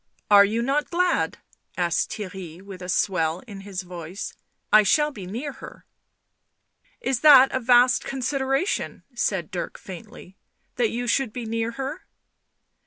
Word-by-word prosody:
Are 200 Hz, -1 st, +9 dB
you 220 Hz, +3 st, 0 dB
not 280 Hz, +4 st, 0 dB
glad 360 Hz, +1 st, +1 dB, 0.2 s
?" -, -, -38 dB
asked 170 Hz, -, 0 dB
Theirry, 185 Hz, -5 st, -7 dB
with 190 Hz, -1 st, -11 dB
a 180 Hz, -, -7 dB
swell 175 Hz, -2 st, 0 dB
in 200 Hz, -4 st, -9 dB
his 195 Hz, -2 st, -6 dB
voice. 175 Hz, +1 st, -7 dB, 0.2 s
" -, -, -20 dB
I 215 Hz, -, +9 dB
shall 295 Hz, +9 st, +2 dB
be 200 Hz, -9 st, -9 dB
near 245 Hz, +10 st, -4 dB
her... -, -, -12 dB, 0.6 s
." -, -, -42 dB
"Is 265 Hz, -, 0 dB
that 270 Hz, -3 st, +8 dB
a 260 Hz, -, 0 dB
vast 245 Hz, +1 st, +4 dB
consideration?" 270 Hz, +5 st, -1 dB
said 190 Hz, -8 st, -1 dB
Dirk 180 Hz, -, -4 dB
faintly. 185 Hz, 0 st, -11 dB, 0.2 s
" -, -, -47 dB
That 240 Hz, -3 st, +2 dB
you 245 Hz, +1 st, -3 dB
should 250 Hz, -1 st, +1 dB
be 240 Hz, +1 st, -6 dB
near 230 Hz, +1 st, -2 dB
her 275 Hz, +7 st, -6 dB
225 Hz, 165 wpm, -24 LUFS, 190-265 Hz, 0.6 s, Are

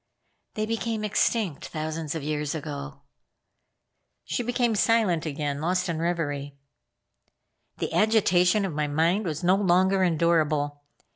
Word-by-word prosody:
"They 215 Hz, -, -1 dB
became 225 Hz, -1 st, -2 dB
extinct 210 Hz, -, 0 dB
thousands 155 Hz, 0 st, -4 dB
of 160 Hz, -, -4 dB
years 150 Hz, 0 st, -2 dB
ago." 145 Hz, -2 st, -6 dB, 1.2 s
She -, -, -2 dB
became 240 Hz, -1 st, 0 dB
silent 210 Hz, -7 st, +2 dB
again, 145 Hz, -1 st, -3 dB
lost 180 Hz, +2 st, 0 dB
in 165 Hz, -2 st, -2 dB
reverie. 145 Hz, -5 st, -2 dB, 1.2 s
The -, -, -3 dB
agitation 205 Hz, -3 st, +3 dB
of 185 Hz, -, -4 dB
my 150 Hz, 0 st, -1 dB
mind 165 Hz, +8 st, +1 dB
was 155 Hz, -1 st, -3 dB
not 185 Hz, +3 st, +4 dB
longer 190 Hz, +1 st, +3 dB
endurable. 155 Hz, -4 st, +1 dB
170 Hz, 125 wpm, -26 LUFS, 150-195 Hz, 1.2 s, not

